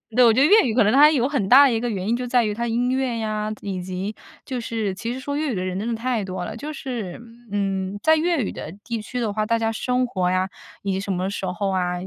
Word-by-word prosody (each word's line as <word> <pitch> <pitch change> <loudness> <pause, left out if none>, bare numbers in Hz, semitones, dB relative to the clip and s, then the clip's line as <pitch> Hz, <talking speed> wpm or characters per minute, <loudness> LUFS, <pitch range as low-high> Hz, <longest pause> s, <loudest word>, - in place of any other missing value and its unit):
对， 250 0 +7
我 230 - +6
觉 255 - +3
得 - - +6
粤 430 +5 +7
语 225 - 0
可 240 - +5
能 210 - +3
它 290 +3 +8
有 260 -5 +2
很 270 -9 -1
大 275 +3 +9
的 255 - +1
一 225 - 0
个 240 +1 -2
原 195 -3 -3
因 230 - +2
就 250 +1 -3
在 245 0 +3
于 210 - -1
它 235 +3 -2
音 240 +2 0
乐 260 -2 0
呀， 215 -1 -2
以 190 -3 -4
及 185 +3 -4 0.3
就 255 -3 -3
是 225 -4 -2
其 230 +5 -4
实 255 - -6
说 285 +2 -4
粤 305 -2 -1
语 - - -3
的 185 - -2
人 185 0 -3
真 220 - -3
的 235 - -1
太 235 -1 -1
多 185 -1 -4
了， - - -6
就 300 +6 -6
是， 235 -10 -5 0.3
嗯， 195 -1 -1
在 315 - +5
粤 335 +1 +1
语 - - -3
的 155 - -7
地 230 -1 -4
区 250 +4 -5
的 225 -4 -1
话， 215 0 0
大 230 +2 +1
家 225 0 0
生 250 +3 0
活 185 -7 -1
呀， 185 +1 0 0.3
以 200 - -1
及 190 - -1
什 200 0 -3
么 185 +1 -1
时 195 -1 -4
候 185 +2 -2
啊， 180 -2 0
225 Hz, 315 characters per minute, -23 LUFS, 195-250 Hz, 0.3 s, 大